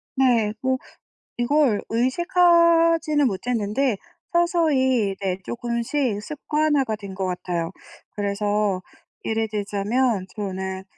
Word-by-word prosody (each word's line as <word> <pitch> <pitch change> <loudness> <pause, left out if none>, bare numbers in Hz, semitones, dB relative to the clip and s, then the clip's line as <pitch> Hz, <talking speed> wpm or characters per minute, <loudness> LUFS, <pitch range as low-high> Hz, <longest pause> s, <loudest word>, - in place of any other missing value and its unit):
네. 235 -5 +3
뭐 260 0 +1 0.6
이걸 245 -3 +2
의식하지는 330 +3 +3
못했는데 225 +3 -1 0.4
서서히 285 - +2
이제 190 -1 -3
쪼끔씩 235 -1 -2
습관화가 295 -3 0
된 200 -2 -9
것 190 0 -2
같아요. 175 -2 -3 0.4
그래서 205 -1 0 0.4
예를 225 0 0
들자면 210 +1 0
저는 190 -2 -4
235 Hz, 220 characters per minute, -23 LUFS, 200-285 Hz, 0.6 s, 네